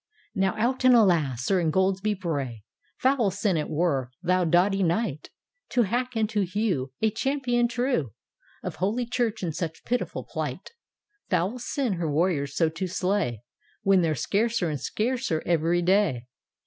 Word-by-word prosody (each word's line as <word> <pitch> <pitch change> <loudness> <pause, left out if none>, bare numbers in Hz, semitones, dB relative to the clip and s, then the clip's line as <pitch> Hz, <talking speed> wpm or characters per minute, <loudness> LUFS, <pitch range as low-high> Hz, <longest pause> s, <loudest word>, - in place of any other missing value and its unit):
" - - -34
Now 190 -1 +1
out 250 +4 0
and 255 -1 +7
alasl 170 - +3
Sir 155 +10 +1
Ingoldsby 190 +5 +1
Bray, 140 - -3 0.3
Foul 255 -5 +2
sin 200 0 0
it 155 - -1
were, 150 -6 0
thou 185 0 +2
doughty 180 +4 +3
Kni^t, 170 - 0 0.5
To 245 - +4
hack 245 +4 -2
and 220 -1 +2
to 210 -2 +1
hew 185 -8 -1
A 220 - +4
champion 245 0 0
true 240 - -1 0.5
Of - - -5
holy 215 +7 0
Church 230 -3 -1
in 170 - -1
such 160 0 -4
pitiful 245 +1 -2
plight - - -5
I 420 -3 -46
Foul 185 +7 0
sin 245 -2 -1
her 165 -3 -1
warriors 145 -3 0
so 165 - +3
to 165 +4 -3
slay, 180 - -1 0.4
When 195 -1 +4
they're 160 -2 +1
scarcer 200 - 0
and 145 - -4
scarcer 235 -7 -1
every 170 +1 +2
day! 175 - +2
190 Hz, 160 wpm, -26 LUFS, 165-230 Hz, 0.5 s, and